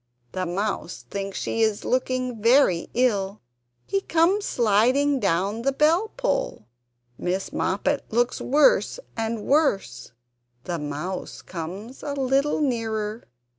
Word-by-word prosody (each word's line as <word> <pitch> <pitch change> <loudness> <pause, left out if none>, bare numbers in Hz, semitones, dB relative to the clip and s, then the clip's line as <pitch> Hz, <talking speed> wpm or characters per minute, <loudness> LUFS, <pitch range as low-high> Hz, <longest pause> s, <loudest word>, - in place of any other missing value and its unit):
The 185 -1 -2
Mouse 175 - -3
thinks 195 -1 -4
she 225 - -2
is 220 -2 +1
looking 255 -2 -1
very 230 -7 +4
ill. 210 -5 +1 0.5
He 390 - 0
comes 370 +5 +2
sliding 250 +6 +3
down 195 +2 0
the 275 +3 +1
bellpull. 440 - 0 0.5
Miss 185 +2 -2
Moppet 275 +9 0
looks 240 +2 +1
worse 305 - +3 0.2
and 225 -1 -3
worse. 235 - +1 0.5
The 175 -2 -3
Mouse 150 +6 -5
comes 190 +9 -7
a 285 - -3
little 275 +2 +1
nearer. 225 -4 -2
230 Hz, 115 wpm, -24 LUFS, 195-280 Hz, 0.5 s, very